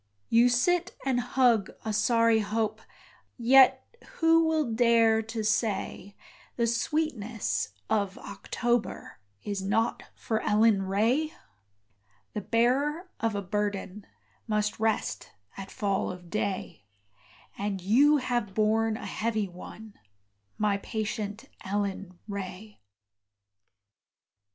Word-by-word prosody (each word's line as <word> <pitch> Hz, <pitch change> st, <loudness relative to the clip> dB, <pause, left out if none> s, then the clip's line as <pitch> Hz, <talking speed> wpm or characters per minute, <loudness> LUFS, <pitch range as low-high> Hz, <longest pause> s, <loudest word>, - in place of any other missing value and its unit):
You 235 Hz, +2 st, +5 dB
sit 355 Hz, +9 st, +1 dB
and 260 Hz, -2 st, +1 dB
hug 245 Hz, -4 st, +2 dB, 0.2 s
a 220 Hz, -, -1 dB
sorry 230 Hz, +1 st, +3 dB
hope 215 Hz, +1 st, -2 dB, 0.6 s
Yet 260 Hz, +2 st, +5 dB, 0.3 s
who 325 Hz, 0 st, +4 dB
will 310 Hz, -7 st, 0 dB
dare 230 Hz, -1 st, +4 dB
to 225 Hz, 0 st, -5 dB
say, 205 Hz, -2 st, -1 dB, 0.4 s
The 235 Hz, -, +1 dB
sweetness 235 Hz, -, -1 dB, 0.2 s
of 200 Hz, -2 st, 0 dB
October 240 Hz, -, -3 dB, 0.2 s
Is 200 Hz, -2 st, -3 dB
not 220 Hz, +4 st, 0 dB
for 220 Hz, -1 st, -2 dB
Ellen 210 Hz, -1 st, +3 dB
Ray? 235 Hz, +11 st, +1 dB, 1.0 s
The 210 Hz, -, -3 dB
bearer 280 Hz, -, +1 dB
of 225 Hz, -2 st, -1 dB
a 200 Hz, -, -2 dB
burden 205 Hz, 0 st, -3 dB, 0.4 s
Must 210 Hz, -1 st, -1 dB
rest 220 Hz, -1 st, -1 dB, 0.2 s
at 195 Hz, 0 st, -8 dB
fall 200 Hz, -2 st, -1 dB
of 180 Hz, -1 st, -11 dB
day; 195 Hz, -, -3 dB, 0.7 s
And 200 Hz, -1 st, -3 dB
you 265 Hz, +11 st, +4 dB
have 240 Hz, -7 st, -2 dB
borne 220 Hz, +1 st, +2 dB
a -, -, -8 dB
heavy 220 Hz, -2 st, -1 dB
one, 205 Hz, +4 st, -11 dB, 0.6 s
My 210 Hz, -1 st, +1 dB
patient 215 Hz, +2 st, -4 dB, 0.2 s
Ellen 195 Hz, -2 st, -3 dB
Ray. 200 Hz, -, -7 dB
220 Hz, 110 wpm, -28 LUFS, 205-240 Hz, 1.0 s, You